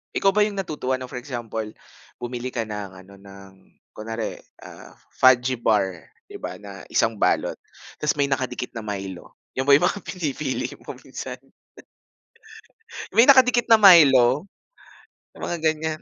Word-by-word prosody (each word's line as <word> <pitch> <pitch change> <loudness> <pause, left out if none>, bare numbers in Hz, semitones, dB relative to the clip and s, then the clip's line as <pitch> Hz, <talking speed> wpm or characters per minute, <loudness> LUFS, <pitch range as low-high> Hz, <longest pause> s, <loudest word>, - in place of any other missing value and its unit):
Ikaw 195 - +3
ba 210 +1 +2
yung 205 - -7
natutuwa 150 -9 -3
ng 130 -1 -8
for 125 - -5
example, 120 -4 -5 0.5
bumili 120 0 -6
ka 120 -2 -3
ng 105 -2 -6
ano 100 +1 -17
ng, 100 0 -14 0.4
kunwari, 115 +1 -6 0.2
ah, - - -13 0.2
Fudgee 130 -1 +3
Bar 95 -8 -1 0.2
'di - - -9
ba - - -5
na 100 -2 -11
1 115 - +1
balot, - - +1 0.5
ta's 150 - +1
may 140 - +2
nakadikit 130 -2 -3
na 115 - -6
Milo. 95 -3 -7 0.2
'Yon 130 +1 -3
ba 140 - +8
'yong 155 - +3
mga 200 - -1
pinipili 150 -8 -3
mo - - -9
minsan? - - -8 1.8
May 230 - +8
nakadikit 250 -3 +6
na 225 -1 +5
Milo. 145 - +6 0.9
Sa - - -15
mga 175 - -3
ganiyan. 155 0 -1
130 Hz, 150 wpm, -23 LUFS, 110-155 Hz, 1.8 s, ba